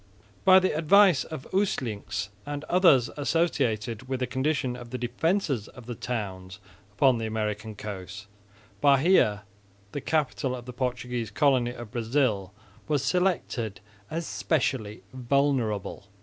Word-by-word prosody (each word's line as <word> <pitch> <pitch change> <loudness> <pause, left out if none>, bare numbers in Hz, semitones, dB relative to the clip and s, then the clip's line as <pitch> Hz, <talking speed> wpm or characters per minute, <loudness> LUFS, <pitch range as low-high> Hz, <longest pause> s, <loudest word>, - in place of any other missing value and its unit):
By 185 0 +8
the 185 -4 +2
advice 175 +1 +5
of 155 -5 -8
Usselincx 105 - -1
and 145 0 -5
others 155 -10 +4
acquainted 130 -7 0
with 130 -1 -1
the 130 - 0
condition 130 0 -1
of 120 -1 -10
the 125 - -4
defences 130 - -1
of 125 - -13
the 120 - -5
towns 100 -6 -5 0.4
upon 125 +3 +3
the 110 - -2
American 110 0 -3
coast, 100 -1 -7 0.6
Bahia, 140 - +4 0.5
the 145 - -4
capital 140 -4 0
of 125 -1 -9
the 125 - -8
Portuguese 125 -2 -3
colony 130 0 +2
of 120 -3 -9
Brazil, 115 -5 0 0.4
was 145 -3 +1
selected, 140 - 0 0.3
as 165 +1 -3
specially 130 -11 -1
vulnerable. 125 -6 0
125 Hz, 130 wpm, -27 LUFS, 110-145 Hz, 0.6 s, By